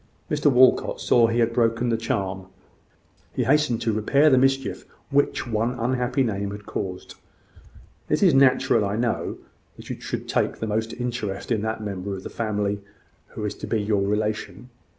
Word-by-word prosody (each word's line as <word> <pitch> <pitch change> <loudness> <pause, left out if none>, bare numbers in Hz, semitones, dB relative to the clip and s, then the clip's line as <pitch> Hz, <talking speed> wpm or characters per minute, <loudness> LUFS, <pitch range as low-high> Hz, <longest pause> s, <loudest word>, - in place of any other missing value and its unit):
Mr 150 -1 +3
Walcot 130 0 +4
saw 120 -1 +4
that 115 - -1
he 120 - +1
had 115 0 +1
broken 115 0 +1
the 115 - +2
charm: 95 -4 -3 0.9
he - - +1
hastened 150 -6 +2
to 110 - +1
repair 140 +8 +3
the 130 - +5
mischief 135 0 +1 0.3
which 140 +1 +1
one 115 +2 -1
unhappy 125 +2 0
name 100 -4 -2
had 105 0 -8
caused. 90 -2 -5 1.0
"It 150 - +2
is 180 - +6
natural, 130 -4 +4
I 100 0 -1
know, 115 +1 -1 0.4
that - - -9
you - - -7
should - - -5
take - - 0
the - - -3
most 110 +1 -2
interest 120 -4 -4
in 110 -3 +1
that 110 0 -3
member 100 -1 -4
of 95 - -8
the - - -7
family 105 -2 -2 0.5
who 105 - -4
is 105 - -2
to - - -8
be 110 - 0
your 105 -1 0
relation. 105 +4 -2
115 Hz, 180 wpm, -24 LUFS, 105-125 Hz, 1.0 s, is